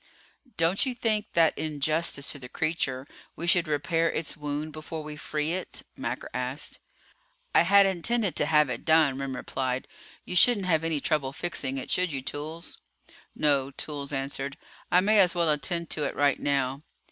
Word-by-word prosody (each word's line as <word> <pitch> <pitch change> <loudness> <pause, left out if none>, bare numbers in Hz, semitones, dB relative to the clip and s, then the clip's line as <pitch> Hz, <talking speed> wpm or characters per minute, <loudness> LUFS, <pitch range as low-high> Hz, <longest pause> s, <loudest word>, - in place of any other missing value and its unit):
"Don't 165 +4 +2
you 255 - -2
think 215 -3 0
that 165 -2 +4
in 155 -1 -4
justice 155 -1 0
to 145 - -7
the 125 -1 -10
creature 140 -5 -1 0.3
we 170 - -4
should 175 0 +4
repair 165 +3 +1
its 160 - -3
wound 150 +1 -4
before 155 +1 -6
we 150 0 -7
free 150 +1 -2
it?" 185 - -4
Macker - - -4
asked. - - -3 0.7
"I - - +7
had 200 +3 +6
intended 195 +2 +1
to - - +2
have 150 -1 +5
it 125 -2 -5
done," 155 -4 +4
Remm 135 -1 -3
replied. 130 0 -3 0.4
"You 180 - -5
shouldn't 205 +1 +5
have 165 -3 +2
any 160 -3 -1
trouble 140 -4 0
fixing 140 -5 -3
it, 130 - -4
should 180 -2 +1
you, 135 -2 -4
Toolls?" 155 +5 -6 0.6
"No," 140 -3 +2
Toolls 140 0 -6
answered. 135 +1 -3 0.3
"I 180 - +6
may 210 +2 +4
as 180 -2 +5
well 170 -2 +3
attend 165 +4 -1
to 150 - -1
it - - -3
right 145 -1 +2
now." 135 -1 0
155 Hz, 180 wpm, -27 LUFS, 140-170 Hz, 0.7 s, I